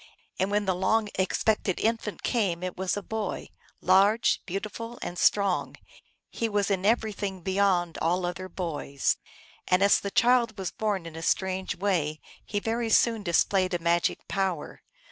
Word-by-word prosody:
And 190 - +1
when 205 0 +1
the 190 - +2
long 205 +4 +1
expected 190 0 0
infant 225 -2 -1
came 190 -8 0
it 185 -1 -3
was 190 +1 -1
a 205 - -4
boy, 220 -2 -4 0.3
large, 200 +5 +4
beautiful, 215 +5 -5
and 175 - -5
strong; 200 -3 +2 0.6
he 230 - -2
was 205 -1 0
in 195 0 +1
everything 210 -4 0
beyond 190 -3 +1
all 175 +2 +1
other 185 +1 -4
boys. 150 -6 -2 0.5
And 185 +2 +3
as 200 - +5
the 200 - -4
child 235 0 +3
was 190 -2 -3
born 205 -5 -2
in 165 -1 -9
a 165 - -6
strange 190 +2 -1
way, 170 -6 0 0.2
he 205 - -2
very 230 +2 -2
soon 225 0 +3
displayed 185 0 +2
a - - -1
magic 170 0 0
power. 190 -6 -2
195 Hz, 160 wpm, -27 LUFS, 180-210 Hz, 0.6 s, as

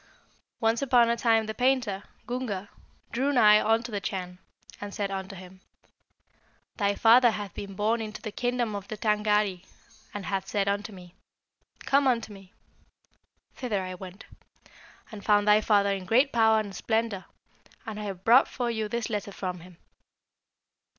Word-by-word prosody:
"Once 225 +1 +1
upon 245 -3 +4
a - - +1
time 225 -2 +2
the 220 - -4
painter, 245 -5 +1 0.2
Gunga, 220 -6 -4 0.4
drew 265 +4 0
nigh 215 -5 +6
unto 225 +2 +1
the 205 -1 -3
Chan, 180 -1 -5 0.4
and 205 0 -6
said 200 -3 -2
unto 195 0 -5
him, 185 0 -13 1.2
'Thy 200 -2 +1
father 240 +3 +6
hath 205 -4 -5
been 200 -1 -7
borne 220 +3 0
into 215 -1 -6
the 215 - -6
kingdom 245 -1 -1
of 200 -1 -6
the 215 - -6
Tângâri, 210 -3 +1 0.5
and 205 -2 -6
hath 195 -1 -2
said 200 -1 -1
unto 205 +2 -1
me, 180 -3 -13 0.7
"Come 280 0 +3
unto 230 -4 0
me!" 195 -1 -15 1.0
Thither 210 -7 -2
I 185 0 -5
went, 185 +2 -10 0.9
and 210 -2 -9
found 205 -1 +3
thy 210 +1 +6
father 200 -2 +3
in 195 -2 -3
great 260 +5 +3
power 220 -2 +4
and 205 -2 -5
splendour; 220 -3 -1 0.6
and 220 -2 -6
I - - -5
have 190 -2 -6
brought 245 +4 +6
for 245 -2 -3
you 220 -2 -2
this 235 +1 -2
letter 210 -2 -4
from 185 -2 -5
him.' 175 0 -15
210 Hz, 165 wpm, -27 LUFS, 195-230 Hz, 1.2 s, nigh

